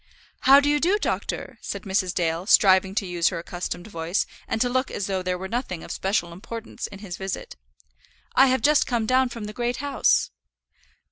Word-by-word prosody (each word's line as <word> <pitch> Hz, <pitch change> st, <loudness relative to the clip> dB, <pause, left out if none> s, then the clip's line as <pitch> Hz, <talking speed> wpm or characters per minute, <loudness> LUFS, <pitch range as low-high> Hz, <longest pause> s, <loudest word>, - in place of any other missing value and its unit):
"How 275 Hz, +1 st, +7 dB
do 285 Hz, -, 0 dB
you 295 Hz, 0 st, +3 dB
do, 365 Hz, +7 st, +3 dB
doctor?" -, -, -3 dB
said -, -, -5 dB
Mrs. 190 Hz, -2 st, 0 dB
Dale, 170 Hz, +1 st, -1 dB
striving 190 Hz, -2 st, +5 dB
to 205 Hz, -, 0 dB
use 175 Hz, -2 st, 0 dB
her -, -, 0 dB
accustomed 175 Hz, +1 st, -5 dB
voice, 170 Hz, -2 st, -1 dB, 0.2 s
and 225 Hz, -, -1 dB
to 245 Hz, -, +3 dB
look 255 Hz, +2 st, 0 dB
as 200 Hz, -, -3 dB
though 190 Hz, -1 st, -1 dB
there 180 Hz, 0 st, -2 dB
were 190 Hz, +1 st, -5 dB
nothing 210 Hz, -6 st, -3 dB
of -, -, -8 dB
special 190 Hz, -3 st, -1 dB
importance 225 Hz, +6 st, -7 dB
in 200 Hz, -, -11 dB
his 190 Hz, -4 st, -7 dB
visit. 190 Hz, 0 st, -5 dB, 0.8 s
"I 270 Hz, -, +6 dB
have 260 Hz, 0 st, +1 dB
just 300 Hz, 0 st, +4 dB
come 235 Hz, -3 st, 0 dB
down 255 Hz, +2 st, +3 dB
from 230 Hz, -2 st, -7 dB
the 210 Hz, 0 st, -6 dB
Great 240 Hz, +2 st, -2 dB
House." 285 Hz, +1 st, +1 dB
205 Hz, 200 wpm, -24 LUFS, 180-250 Hz, 0.8 s, How